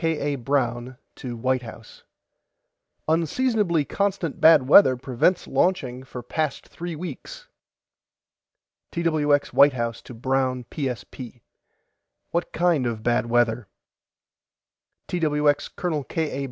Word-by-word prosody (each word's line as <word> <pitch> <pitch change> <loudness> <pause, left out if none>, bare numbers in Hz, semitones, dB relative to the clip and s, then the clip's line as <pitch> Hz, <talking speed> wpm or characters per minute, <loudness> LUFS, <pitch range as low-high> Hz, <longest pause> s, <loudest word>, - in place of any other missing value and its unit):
K. 155 -3 0
A. - - -2
BROWN 125 -1 -2 0.2
TO 120 -3 -7
WHITE 130 +2 0
HOUSE: 115 -1 -12 1.1
UNSEASONABLY 170 - +1
CONSTANT 195 -5 -2
BAD 160 -4 +7
WEATHER 135 -4 +7
PREVENTS 130 +8 0
LAUNCHING 130 -9 0
FOR 125 -2 -8
PAST 150 +3 -3
THREE 170 -1 -6
WEEKS - - -8 1.4
TWX 155 -4 +1
WHITE 140 0 +6
HOUSE 115 -2 -3
TO 125 - -12
BROWN 130 +1 -1
PSP: 125 -3 -6 0.9
WHAT 170 +1 -2
KIND 165 -7 +1
OF 110 -2 -4
BAD 120 -1 +1
WEATHER 120 -2 +1 1.4
TWX 150 -4 +1
COL. 160 -5 -2
K. 160 +2 -2
A. - - -4
140 Hz, 115 wpm, -24 LUFS, 125-165 Hz, 1.4 s, BAD